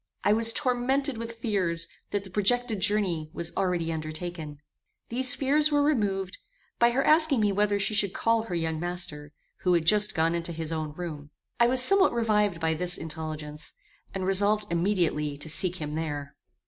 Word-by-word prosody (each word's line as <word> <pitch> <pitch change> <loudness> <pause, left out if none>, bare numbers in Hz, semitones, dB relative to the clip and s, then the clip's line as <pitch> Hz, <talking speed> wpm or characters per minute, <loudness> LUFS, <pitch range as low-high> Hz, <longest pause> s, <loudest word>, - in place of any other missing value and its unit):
I 205 - +3
was 225 +1 +3
tormented 260 0 0
with 230 0 -6
fears 185 -7 -1 0.2
that 205 -1 -2
the 190 - -11
projected 220 +2 0
journey 185 -7 0
was 170 0 -3
already 175 -4 -1
undertaken. 155 -1 -6 0.5
These 255 +2 +5
fears 295 +3 +2
were 290 -1 +3
removed, 200 -10 -1 0.4
by 235 - +5
her 260 +3 0
asking 310 -4 +4
me 210 -1 +2
whether 205 +1 +1
she 195 +2 +1
should 200 -2 +2
call 230 +3 +1
her 220 -5 -5
young 160 -1 -2
master, 170 -4 -5 0.3
who 180 -1 +2
had 165 -2 0
just 210 +4 +4
gone 165 0 +1
into 170 0 -2
his 160 0 -3
own 155 -2 -4
room. 150 -4 -7 0.3
I 235 - +5
was 255 +1 +5
somewhat 390 +1 +4
revived 210 -6 +1
by 160 -1 0
this 180 +2 -3
intelligence, 155 -1 -6 0.4
and 190 -1 -4
resolved 205 +2 +3
immediately 170 -5 0
to 145 - -4
seek 180 +3 +2
him 150 -4 -6
there. 145 -3 -5
190 Hz, 175 wpm, -27 LUFS, 160-225 Hz, 0.5 s, These